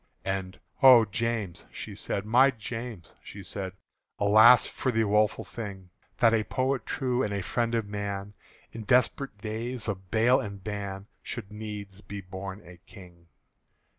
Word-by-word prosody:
And 95 Hz, -1 st, -3 dB, 0.2 s
"O 125 Hz, -4 st, +9 dB
James!" 110 Hz, -3 st, -3 dB
she -, -, -7 dB
said, 100 Hz, -, -3 dB
"My 125 Hz, +5 st, +5 dB
James!" 115 Hz, -4 st, -6 dB
she 100 Hz, -, -10 dB
said, 95 Hz, 0 st, -6 dB, 0.4 s
"Alas 110 Hz, +4 st, +7 dB
for 130 Hz, -, -2 dB
the 115 Hz, -1 st, +2 dB
woeful 105 Hz, 0 st, +2 dB
thing, 95 Hz, -5 st, -8 dB, 0.3 s
That 115 Hz, -2 st, +5 dB
a 110 Hz, -1 st, +2 dB
poet 130 Hz, +2 st, -1 dB
true 125 Hz, -2 st, 0 dB
and 105 Hz, -, -1 dB
a 100 Hz, -1 st, -2 dB
friend 115 Hz, +2 st, 0 dB
of 115 Hz, -2 st, 0 dB
man, 100 Hz, -1 st, -4 dB, 0.4 s
In 115 Hz, -, -7 dB
desperate 125 Hz, +2 st, +1 dB
days 110 Hz, +3 st, -3 dB
of 95 Hz, -3 st, -4 dB
bale 120 Hz, +5 st, +4 dB
and 100 Hz, -2 st, -6 dB
ban, 100 Hz, -2 st, -5 dB, 0.2 s
Should 95 Hz, -, -5 dB
needs 105 Hz, -2 st, -7 dB
be 100 Hz, -1 st, -7 dB
born 95 Hz, +1 st, -7 dB
a 90 Hz, 0 st, -12 dB
King!" 90 Hz, -2 st, -16 dB
105 Hz, 155 wpm, -28 LUFS, 95-115 Hz, 0.4 s, O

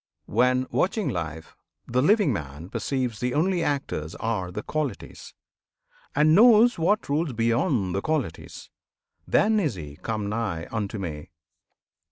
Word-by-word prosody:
When, 125 Hz, +1 st, +2 dB
watching 200 Hz, +2 st, 0 dB
life, 80 Hz, -2 st, -5 dB, 0.3 s
the 125 Hz, +2 st, 0 dB
living 200 Hz, -, +3 dB
man 75 Hz, -1 st, -6 dB
perceives 125 Hz, -5 st, -2 dB
The 125 Hz, 0 st, -1 dB
only 175 Hz, +3 st, +1 dB
actors 115 Hz, -, -2 dB
are 105 Hz, -5 st, -2 dB
the 105 Hz, +4 st, -6 dB
Qualities, 150 Hz, -9 st, -5 dB, 0.8 s
And 155 Hz, +2 st, +4 dB
knows 225 Hz, +2 st, +6 dB
what 205 Hz, +7 st, +1 dB
rules 145 Hz, 0 st, 0 dB
beyond 115 Hz, -, +1 dB
the 100 Hz, -, -1 dB
Qualities, 150 Hz, -, -4 dB, 0.6 s
Then 215 Hz, +1 st, +3 dB
is 155 Hz, -, 0 dB
he 75 Hz, -4 st, -9 dB
come 105 Hz, +2 st, -3 dB
nigh 100 Hz, -7 st, -3 dB
unto 110 Hz, -1 st, -3 dB
Me! 80 Hz, -6 st, -6 dB
125 Hz, 135 wpm, -25 LUFS, 95-155 Hz, 0.8 s, knows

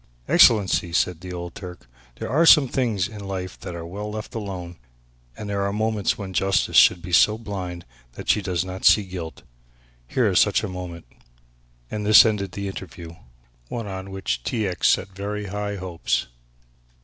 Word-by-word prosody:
"Excellency," 100 Hz, -5 st, +4 dB
said 90 Hz, -1 st, 0 dB
the 90 Hz, 0 st, -8 dB
old 85 Hz, -1 st, -6 dB
Turk 90 Hz, -3 st, -9 dB
soberly, -, -, -28 dB, 0.2 s
"there -, -, -5 dB
are 160 Hz, +5 st, +4 dB
some 150 Hz, -5 st, +8 dB
things 115 Hz, -8 st, 0 dB
in 105 Hz, -, -10 dB
life 95 Hz, -2 st, -5 dB
that 90 Hz, -, -7 dB
are 85 Hz, -1 st, -6 dB
well 100 Hz, +5 st, -6 dB
left 110 Hz, +3 st, -7 dB
alone 95 Hz, -6 st, -6 dB, 0.6 s
and 105 Hz, -, -7 dB
there 100 Hz, -1 st, -2 dB
are 100 Hz, 0 st, 0 dB
moments 110 Hz, 0 st, 0 dB
when 95 Hz, -2 st, -7 dB
justice 95 Hz, +1 st, +1 dB
should 85 Hz, -, +6 dB
be 90 Hz, -, -7 dB
so 105 Hz, +5 st, +5 dB
blind 95 Hz, -6 st, -6 dB, 0.3 s
that -, -, -10 dB
she 105 Hz, -, +3 dB
does 90 Hz, -3 st, -2 dB
not 95 Hz, 0 st, -7 dB
see 105 Hz, -, +6 dB
guilt; 90 Hz, -4 st, -8 dB, 0.6 s
here -, -, +1 dB
is -, -, +3 dB
such -, -, +3 dB
a -, -, -2 dB
moment." 90 Hz, -2 st, -7 dB, 0.9 s
And 105 Hz, -1 st, -3 dB
this 105 Hz, +2 st, +8 dB
ended 100 Hz, -4 st, -1 dB
the 100 Hz, 0 st, -4 dB
interview, 85 Hz, -3 st, -8 dB, 0.5 s
one 115 Hz, -, -5 dB
on 95 Hz, -1 st, -6 dB
which 95 Hz, -10 st, -3 dB
T. 110 Hz, -, -1 dB
X. 90 Hz, -, +3 dB
had -, -, -7 dB
set 95 Hz, -, -23 dB
very 105 Hz, +1 st, -4 dB
high 105 Hz, 0 st, -3 dB
hopes. 90 Hz, -3 st, -2 dB
95 Hz, 185 wpm, -23 LUFS, 90-105 Hz, 0.9 s, some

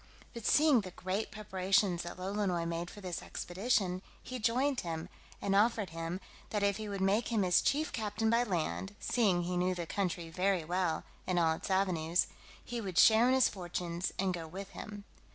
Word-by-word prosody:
But 235 Hz, -3 st, -4 dB
seeing 295 Hz, -5 st, +5 dB
the 190 Hz, -, -7 dB
great 185 Hz, +4 st, -3 dB
preparations 190 Hz, -3 st, +1 dB
that 175 Hz, +1 st, -7 dB
Lolonois 185 Hz, -2 st, -1 dB
made 170 Hz, +1 st, -3 dB
for 205 Hz, -, -11 dB
this 180 Hz, -3 st, -4 dB
expedition, 185 Hz, -1 st, -1 dB, 0.2 s
he 255 Hz, 0 st, -5 dB
joined 250 Hz, +4 st, +2 dB
him, 165 Hz, 0 st, -4 dB, 0.3 s
and 195 Hz, 0 st, 0 dB
offered 210 Hz, -3 st, +3 dB
him, 165 Hz, +2 st, -4 dB, 0.3 s
that 210 Hz, -2 st, -1 dB
if 200 Hz, -1 st, +2 dB
he 215 Hz, -1 st, -5 dB
would 200 Hz, -1 st, -3 dB
make 200 Hz, +4 st, +2 dB
him 220 Hz, -4 st, +2 dB
his 180 Hz, -1 st, +4 dB
chief 305 Hz, +2 st, +1 dB
captain 220 Hz, 0 st, 0 dB
by 235 Hz, +1 st, +4 dB
land 190 Hz, 0 st, -2 dB
(seeing 195 Hz, -8 st, +2 dB
he 180 Hz, +1 st, -2 dB
knew 180 Hz, +1 st, +1 dB
the 175 Hz, -1 st, -3 dB
country 175 Hz, -2 st, -2 dB
very 185 Hz, 0 st, +1 dB
well, 175 Hz, -1 st, 0 dB, 0.2 s
and 180 Hz, -, +1 dB
all 165 Hz, -2 st, +4 dB
its 160 Hz, -, -6 dB
avenues) 180 Hz, -3 st, +2 dB, 0.4 s
he 240 Hz, -1 st, -4 dB
would 190 Hz, -4 st, -5 dB
share 220 Hz, +5 st, +7 dB
in 260 Hz, -, +4 dB
his 260 Hz, -2 st, +5 dB
fortunes, 175 Hz, -1 st, -3 dB
and 190 Hz, -1 st, +1 dB
go 165 Hz, -2 st, -5 dB
with 195 Hz, +4 st, -7 dB
him. 205 Hz, 0 st, -8 dB
190 Hz, 190 wpm, -33 LUFS, 175-215 Hz, 0.4 s, share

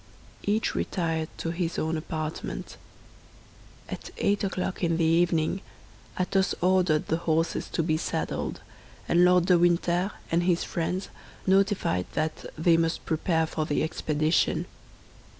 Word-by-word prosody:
Each 210 Hz, +2 st, 0 dB
retired 165 Hz, -3 st, -1 dB
to 165 Hz, -, -2 dB
his 170 Hz, -1 st, -2 dB
own 160 Hz, +1 st, 0 dB
apartment. 155 Hz, 0 st, -4 dB, 1.1 s
At -, -, -7 dB
eight 205 Hz, 0 st, +1 dB
o'clock 190 Hz, -1 st, -2 dB
in 165 Hz, -1 st, +2 dB
the 165 Hz, -, +1 dB
evening 170 Hz, +2 st, +2 dB, 0.6 s
Athos 190 Hz, +1 st, +1 dB
ordered 180 Hz, -4 st, +3 dB
the 160 Hz, -, 0 dB
horses 165 Hz, -1 st, 0 dB
to 165 Hz, -, 0 dB
be 155 Hz, -1 st, +1 dB
saddled, -, -, -3 dB, 0.5 s
and 175 Hz, +1 st, +4 dB
Lord 180 Hz, -1 st, +5 dB
de 180 Hz, -1 st, +5 dB
Winter 175 Hz, +2 st, +2 dB, 0.2 s
and 170 Hz, +1 st, +3 dB
his 175 Hz, -1 st, +2 dB
friends 180 Hz, +3 st, -2 dB, 0.4 s
notified 190 Hz, -, +2 dB
that 155 Hz, 0 st, -2 dB
they 165 Hz, +1 st, +4 dB
must 165 Hz, 0 st, 0 dB
prepare 160 Hz, 0 st, +1 dB
for 155 Hz, -1 st, -3 dB
the 145 Hz, -, +1 dB
expedition. 155 Hz, 0 st, +1 dB
170 Hz, 135 wpm, -27 LUFS, 160-180 Hz, 1.1 s, Lord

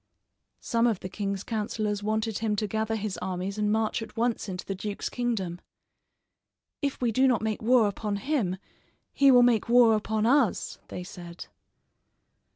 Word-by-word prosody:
Some 230 Hz, 0 st, +1 dB
of 220 Hz, -6 st, 0 dB
the 185 Hz, -, -5 dB
king's 200 Hz, 0 st, -3 dB
counselors 210 Hz, -2 st, -2 dB
wanted 220 Hz, +1 st, -1 dB
him 215 Hz, -1 st, 0 dB
to 210 Hz, -, -1 dB
gather 220 Hz, +2 st, -1 dB
his 215 Hz, -2 st, -3 dB
armies 190 Hz, +2 st, -4 dB
and 210 Hz, 0 st, +1 dB
march 220 Hz, +1 st, 0 dB
at 225 Hz, -, -9 dB
once 230 Hz, -2 st, 0 dB
into 180 Hz, -1 st, -5 dB
the 195 Hz, -, -3 dB
duke's 200 Hz, +1 st, -4 dB
kingdom. 205 Hz, -8 st, -2 dB, 1.2 s
"If 280 Hz, -2 st, -2 dB
we 240 Hz, -2 st, +2 dB
do 260 Hz, +4 st, +3 dB
not 245 Hz, -4 st, +2 dB
make 220 Hz, -1 st, -2 dB
war 235 Hz, -1 st, +4 dB
upon 205 Hz, +1 st, -3 dB
him, 200 Hz, -5 st, -1 dB, 0.6 s
he 275 Hz, -1 st, +5 dB
will 250 Hz, -2 st, +7 dB
make 235 Hz, -2 st, +2 dB
war 240 Hz, -2 st, +6 dB
upon 215 Hz, 0 st, 0 dB
us," 255 Hz, -3 st, +2 dB
they 180 Hz, -, -6 dB
said. 175 Hz, -2 st, -9 dB
215 Hz, 165 wpm, -27 LUFS, 200-235 Hz, 1.2 s, will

